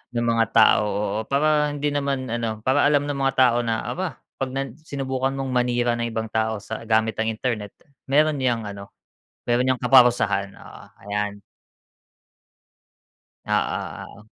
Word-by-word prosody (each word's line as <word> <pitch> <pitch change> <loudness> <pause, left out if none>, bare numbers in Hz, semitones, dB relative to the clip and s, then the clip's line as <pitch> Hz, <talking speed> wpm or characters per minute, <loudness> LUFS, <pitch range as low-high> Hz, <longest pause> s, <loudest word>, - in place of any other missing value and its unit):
ng 120 0 0
mga 115 -1 +2
tao, 110 -2 +5
oo, 100 0 -2
para 150 +1 +2
hindi 145 0 -2
naman 140 -2 -1
ano, 110 -2 -3
para 135 +2 +3
alam 145 -1 +2
ng 145 -1 -3
mga 135 -1 +1
tao 125 -2 +5
na, 115 -1 -2
aba 180 -8 -4 0.2
pag 135 -1 -3
nan 135 -2 -4
sinubukan 135 -3 -3
mong 135 0 -3
manira 120 -1 +1
ng 120 0 -2
ibang 110 0 -3
tao 110 -1 0
sa 110 +3 -7
gamit 110 0 +1
ng 110 0 0
internet 110 -3 -3 0.4
meron 150 +2 +3
niyang 120 -4 0
ano, 100 -1 -8 0.6
meron 120 +1 +2
niyang 130 -1 0
kaparusahan. 120 -6 +4
Oo, - - -13 0.2
ayan. 100 0 -3 2.0
Oo, - - 0 0.5
oo. 105 - -16
120 Hz, 155 wpm, -23 LUFS, 110-135 Hz, 2.0 s, tao